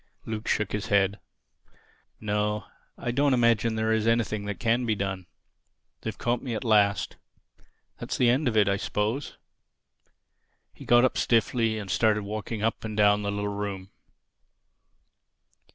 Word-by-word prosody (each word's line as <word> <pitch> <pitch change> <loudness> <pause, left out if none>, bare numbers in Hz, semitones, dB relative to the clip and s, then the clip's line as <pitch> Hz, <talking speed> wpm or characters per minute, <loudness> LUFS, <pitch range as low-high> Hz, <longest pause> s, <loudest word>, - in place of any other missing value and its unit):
Luke 110 0 -5
shook 105 - 0
his 105 -1 -3
head. 100 0 +2 1.0
"No, 105 -1 -1 0.3
I 120 - -3
don't 140 +1 +2
imagine 115 -2 +2
there 110 0 0
is 110 0 0
anything 110 -3 0
can 115 +5 +1
be 110 -3 0
done. 95 -3 -4 0.7
They've - - -5
caught 120 0 -1
me 125 -4 -4
at - - -4
last. 105 -3 +2 0.8
That's - - -4
the 125 - +3
end 130 +4 +2
of 110 -3 0
it, 105 -2 +4
I 100 0 +2
suppose." 110 +7 -2 1.4
He - - -13
got 120 +1 +5
up 130 - 0
stiffly 115 -1 +1
and 100 -3 -5
started 110 -1 +2
walking 105 +1 -5
up 115 - -1
and 110 -1 -5
down 105 0 +4
the 100 - -2
little 105 0 -2
room. 100 -2 -5
110 Hz, 150 wpm, -27 LUFS, 105-115 Hz, 1.4 s, got